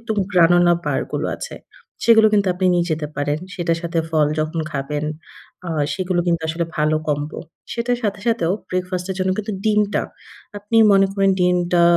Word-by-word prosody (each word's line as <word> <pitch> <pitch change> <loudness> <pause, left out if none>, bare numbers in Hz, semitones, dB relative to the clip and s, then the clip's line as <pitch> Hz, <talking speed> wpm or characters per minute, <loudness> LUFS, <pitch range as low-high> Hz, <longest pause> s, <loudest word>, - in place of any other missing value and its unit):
একটু 230 -1 -3 0.2
গ্রানুলা 175 0 +5
বার - - 0
গুলো - - -1
আছে। - - -7 0.5
সেগুলো 225 -2 +6
কিন্তু 205 -2 +3
আপনি 185 +1 0
নিয়ে 175 -1 +1
যেতে 155 -1 -1
পারেন। 145 +1 -1 0.2
সেটার 170 -2 -1
সাথে 170 0 -2
ফল 155 -2 +3
যখন 155 +2 -2
খাবেন। 145 +1 -3 0.6
আ - - -3 0.2
সেগুলো 185 -2 -1
কিন্তু 170 -1 +1
আসলে 165 +2 -1
ভালো 155 0 +2
কম্বো। 150 0 -2 0.3
সেটার 240 +1 -1
সাথে 205 -2 -2
সাথেও 205 -7 +1 0.2
ব্রেকফাস্ট 180 0 -3
এর - - -2
জন্য 185 0 +1
কিন্তু 215 0 -3
ডিমটা। 210 -1 +2 0.6
আপনি 205 +3 -2 0.2
মনে 195 0 +5
করেন 195 -1 +2
ডিমটা 180 -1 +2
175 Hz, 170 wpm, -20 LUFS, 165-200 Hz, 0.6 s, সেগুলো